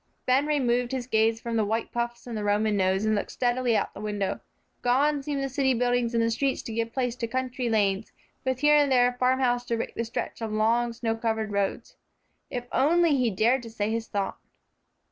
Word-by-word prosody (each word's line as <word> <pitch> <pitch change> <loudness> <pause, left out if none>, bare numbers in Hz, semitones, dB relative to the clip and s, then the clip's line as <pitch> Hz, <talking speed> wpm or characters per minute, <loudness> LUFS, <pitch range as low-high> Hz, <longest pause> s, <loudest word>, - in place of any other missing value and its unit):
Ben 265 +3 +3
removed 250 -4 +1
his 255 -2 -2
gaze 225 -1 +2
from 230 0 -3
the 220 - +3
white 220 +2 -2
puffs 240 0 -3
and 225 -4 -4
Roman 205 +1 +1
nose, 190 +1 +1
and 215 - +2
looked 205 - -1
steadily 245 -2 +1
out - - -1
of - - -33
the - - -9
window. 205 -2 -2 0.4
Gone 280 +4 +2
seemed 275 0 -2
the - - 0
city 265 -1 +1
buildings 245 0 +1
and 230 0 +2
streets 270 +3 -1
to 225 - -6
give 230 0 -2
place 245 -1 -1
to 230 - -2
country 255 0 -2
lanes, 205 -2 +1 0.3
with 260 -1 -1
here 295 0 +6
and 290 -2 +3
there 245 -1 +5
a - - -7
farm 255 +1 +3
house 245 -1 +2
to 235 -1 -1
break 225 - -4
the 230 - -2
stretch 230 0 -5
of 225 -1 -3
long, 230 +3 +2
snow 230 -1 -2
covered 220 -2 -2
roads. 200 -1 -2 0.5
If 245 -1 -4
only 325 +2 +3
he 250 -3 +2
dared 230 +6 +2
to 230 - -9
say 215 -1 -2
his 225 0 -2
thought! 200 -1 -3
235 Hz, 220 wpm, -27 LUFS, 220-255 Hz, 0.5 s, here